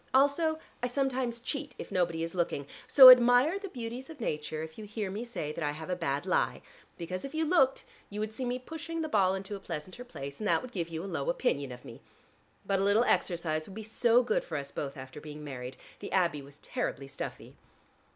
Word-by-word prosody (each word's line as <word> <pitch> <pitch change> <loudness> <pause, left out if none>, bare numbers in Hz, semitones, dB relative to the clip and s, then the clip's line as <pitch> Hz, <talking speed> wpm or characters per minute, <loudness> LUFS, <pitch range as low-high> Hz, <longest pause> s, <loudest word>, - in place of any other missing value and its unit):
Also 285 +4 +4 0.2
I 245 - +1
sometimes 255 -2 -1
cheat, 275 +2 -4
if - - -8
nobody 170 -3 0
is 165 - -4
looking, 170 -5 -1 0.2
so 260 -2 +12
admire 250 +8 +6
the 395 -1 -7
beauties 245 -1 -6
of 320 -3 -10
nature 155 -6 -3
if 160 +5 -9
you - - -6
hear 210 -2 -4
me 210 +4 -4
say 200 -11 -4
that 165 - -5
I 145 0 0
have 160 +4 -6
a - - +1
bad 145 -5 -2
lie, - - 0 0.3
because 180 +2 -5
if 275 +3 -6
you 320 0 +1
looked 285 -5 +3 0.3
you 205 - -6
would 215 0 -3
see 255 - -4
me 245 0 -1
pushing 325 +5 -5
the - - -2
ball 195 -9 +3
into 195 +2 -5
a - - -7
pleasanter 185 +5 -6
place, 140 - -7
and 215 - -1
that - - +2
would 255 - -8
give 170 -7 -3
you 165 0 -4
a - - -5
low 195 - -2
opinion 145 - 0
of 125 - -10
me. - - -11 0.6
But 195 -1 +1
a - - +1
little 205 +4 +4
exercise 165 -8 0
would 195 - -11
be 220 - -6
so 235 +3 +3
good 230 -3 0
for 160 - -4
us 140 0 -4
both 140 -1 -5
after 130 +2 -9
being 150 0 -9
married: 130 -3 -7 0.2
the - - -7
Abbey 170 -6 +2
was 140 +1 -14
terribly 140 -2 -4
stuffy." 135 - -7
200 Hz, 230 wpm, -30 LUFS, 155-255 Hz, 0.6 s, so